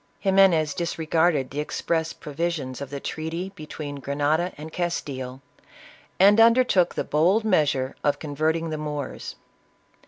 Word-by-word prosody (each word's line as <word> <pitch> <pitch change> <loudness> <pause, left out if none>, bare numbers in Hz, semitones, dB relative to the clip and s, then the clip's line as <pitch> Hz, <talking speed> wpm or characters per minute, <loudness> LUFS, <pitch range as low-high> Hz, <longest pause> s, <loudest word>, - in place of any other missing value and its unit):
Ximenes 190 -6 +4
disregarded 165 -4 0
the 145 - -4
express 160 +2 -1
provisions 150 -4 -4
of 140 - -5
the 140 0 -5
treaty 165 +6 -4
between 150 -4 -7
Grenada 145 +6 0
and 155 +2 -9
Castile, 135 -7 -4 0.8
and 200 +3 +6
undertook 230 -6 +4
the - - -1
bold 180 +9 +2
measure 145 -9 +1
of 145 -1 +2
converting 155 +2 -1
the 155 - -3
Moors. 150 -2 -5
155 Hz, 125 wpm, -25 LUFS, 145-175 Hz, 0.8 s, and